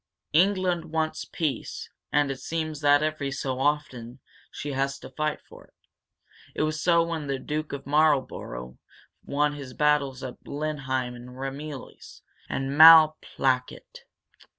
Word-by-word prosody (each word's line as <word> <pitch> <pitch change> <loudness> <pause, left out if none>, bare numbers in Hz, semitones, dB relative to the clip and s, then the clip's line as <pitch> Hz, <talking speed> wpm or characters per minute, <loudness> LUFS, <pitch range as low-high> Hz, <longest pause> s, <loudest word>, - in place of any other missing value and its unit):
"England 180 0 +2
wants 160 -1 -2
peace. 155 -5 -4 0.2
And 145 -2 +2
it 135 - -6
seems 155 -2 -4
that, 145 0 +4
every 155 -2 -2
so 135 -1 -3
often, 135 -4 -2 0.3
she 145 - -6
has 135 0 -1
to 130 - -12
fight 155 +3 -2
for - - -15
it. - - -33 0.8
It - - 0
was 155 0 -2
so 170 -1 +4
when 165 -3 -4
the 135 -1 -1
Duke 150 +3 -4
of 140 -1 -6
Marlborough 135 - 0 0.4
won 145 +1 0
his 140 -3 -9
battles 145 -3 +1
at 130 -2 -8
Blenheim 135 -4 -3
and 120 +1 -11
Ramillies 135 +1 -8 0.3
and 135 0 -2
Malplaquet. 155 -5 +5
145 Hz, 135 wpm, -26 LUFS, 135-155 Hz, 0.8 s, Malplaquet